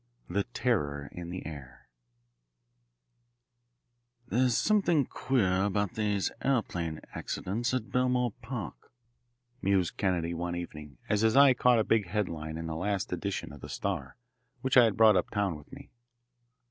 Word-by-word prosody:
IX. - - -9
The 100 +1 +2
Terror 75 - -1
In 85 -1 -7
The 90 +1 -6
Air 70 -5 -9 2.4
"There's 125 -1 +2
something 175 -9 +3
queer 110 -10 +1
about 100 -1 0
these 105 -3 0
aeroplane 85 - -1
accidents 115 +7 -2
at 130 -3 -2
Belmore 125 -1 +2
Park," 115 -2 -7 0.7
mused 95 -3 +1
Kennedy, 85 -4 0
one 85 +1 -3
evening, 75 -5 -7
as 105 -1 +1
his 110 0 +3
eye 140 -2 +8
caught 125 -1 +4
a 110 - +3
big 110 -3 +2
headline 85 -5 -3
in 80 - -5
the 80 -1 -4
last 95 +2 -2
edition 95 -3 -3
of 75 - -12
the - - -8
Star, - - -3 0.4
which 130 - 0
I 125 -2 +9
had 110 - 0
brought 110 -2 +7
uptown 100 -3 0
with 75 - -13
me. - - -12
100 Hz, 145 wpm, -30 LUFS, 85-120 Hz, 2.4 s, I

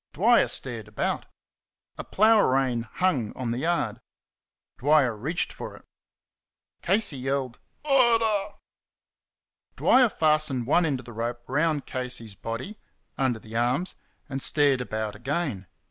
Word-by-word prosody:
Dwyer 230 +8 +4
stared 115 -5 -2
about. 105 - -2 0.7
A - - -6
plough 220 +2 +4
rein 130 - +1
hung 145 - 0
on 125 -3 -2
the 120 - -2
yard. 130 -8 -1 0.8
Dwyer 140 -3 +3
reached 155 +12 -2
for - - -8
it. - - -17 1.0
Casey 195 -8 +1
yelled, 130 -1 -2 0.3
"Murder!" 230 -7 +3 1.2
Dwyer 255 -2 +5
fastened 155 - +1
one 165 +6 +3
end 140 -3 0
of - - -19
the 120 - -10
rope 120 +2 -4
round 150 +1 0
Casey's 125 -4 -5
body 115 - -6 0.4
under 130 -4 0
the 110 0 -11
arms 125 +10 0 0.3
and 135 -1 -4
stared 140 -3 +2
about 110 -3 -4
again. 125 - -3
135 Hz, 130 wpm, -26 LUFS, 120-170 Hz, 1.2 s, Dwyer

